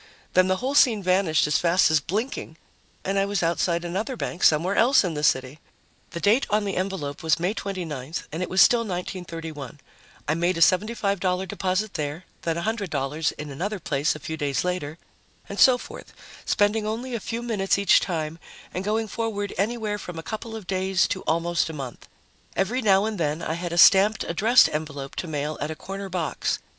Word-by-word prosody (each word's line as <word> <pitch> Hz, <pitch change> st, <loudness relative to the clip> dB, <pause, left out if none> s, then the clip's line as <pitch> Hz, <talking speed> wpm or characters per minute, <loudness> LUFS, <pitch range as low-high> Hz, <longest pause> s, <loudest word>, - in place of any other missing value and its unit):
Then 185 Hz, 0 st, +5 dB
the 185 Hz, -, +2 dB
whole 255 Hz, +8 st, -2 dB
scene 235 Hz, -8 st, +4 dB
vanished 185 Hz, -3 st, +3 dB
as 150 Hz, -1 st, +2 dB
fast 175 Hz, -1 st, +3 dB
as 160 Hz, -, +4 dB
blinking 195 Hz, -, -4 dB, 0.5 s
and 195 Hz, +1 st, +1 dB
I 195 Hz, -, +2 dB
was 200 Hz, -3 st, -1 dB
outside 170 Hz, +1 st, 0 dB
another 210 Hz, +9 st, -3 dB
bank 175 Hz, -, -4 dB
somewhere 165 Hz, +5 st, +4 dB
else 250 Hz, +3 st, +5 dB
in 180 Hz, -3 st, -2 dB
the 150 Hz, -, -3 dB
city. 130 Hz, 0 st, +1 dB, 0.5 s
The 170 Hz, -, -6 dB
date 215 Hz, +9 st, +3 dB
on 210 Hz, 0 st, +1 dB
the 195 Hz, -, -2 dB
envelope 185 Hz, -7 st, -3 dB
was 160 Hz, 0 st, +2 dB
May 180 Hz, +4 st, 0 dB
29th 165 Hz, -, -5 dB
and 160 Hz, +4 st, -4 dB
it 180 Hz, -, -2 dB
was 185 Hz, -, +6 dB
still 240 Hz, -, +5 dB
1931. 165 Hz, -, -6 dB, 0.5 s
I 150 Hz, -, +2 dB
made 175 Hz, +2 st, 0 dB
a -, -, -3 dB
$75 190 Hz, -1 st, +2 dB
deposit 190 Hz, +4 st, -1 dB
there, 155 Hz, +2 st, -4 dB, 0.2 s
then 165 Hz, -1 st, -1 dB
$100 160 Hz, -7 st, -1 dB
in 150 Hz, -1 st, -8 dB
another 195 Hz, +9 st, -3 dB
place 145 Hz, -2 st, 0 dB
a -, -, -7 dB
few 160 Hz, +2 st, -5 dB
days 140 Hz, -4 st, -1 dB
later, 175 Hz, -4 st, -3 dB, 0.5 s
and 200 Hz, -, -6 dB
so 255 Hz, -2 st, +7 dB
forth, -, -, -11 dB, 0.3 s
spending 210 Hz, +1 st, +1 dB
only 240 Hz, +4 st, -4 dB
a 235 Hz, -, -1 dB
few 230 Hz, +3 st, -4 dB
minutes 205 Hz, -6 st, 0 dB
each 200 Hz, 0 st, +5 dB
time 160 Hz, -2 st, -3 dB, 0.3 s
and 185 Hz, -, -3 dB
going 220 Hz, +2 st, 0 dB
forward 205 Hz, -2 st, -3 dB
anywhere 210 Hz, +1 st, -1 dB
from 180 Hz, -3 st, -8 dB
a 165 Hz, -, -6 dB
couple 220 Hz, +2 st, -6 dB
of 220 Hz, -4 st, -8 dB
days 190 Hz, 0 st, +1 dB
to 185 Hz, -, -2 dB
almost 170 Hz, +1 st, +1 dB
a -, -, -6 dB
month. 135 Hz, -5 st, -8 dB, 0.5 s
Every 225 Hz, +7 st, 0 dB
now 200 Hz, -2 st, +4 dB
and 215 Hz, -3 st, -3 dB
then, 155 Hz, 0 st, -1 dB
I 160 Hz, -, -2 dB
had 170 Hz, +1 st, -4 dB
a 170 Hz, -, -3 dB
stamped, 195 Hz, +4 st, +6 dB
addressed 220 Hz, +9 st, +5 dB
envelope 145 Hz, -3 st, -5 dB
to 180 Hz, -, -3 dB
mail 150 Hz, -1 st, -3 dB
at 150 Hz, -, -2 dB
a 160 Hz, -, -4 dB
corner 195 Hz, +3 st, -7 dB
box. 175 Hz, -3 st, -1 dB
185 Hz, 195 wpm, -25 LUFS, 160-205 Hz, 0.5 s, so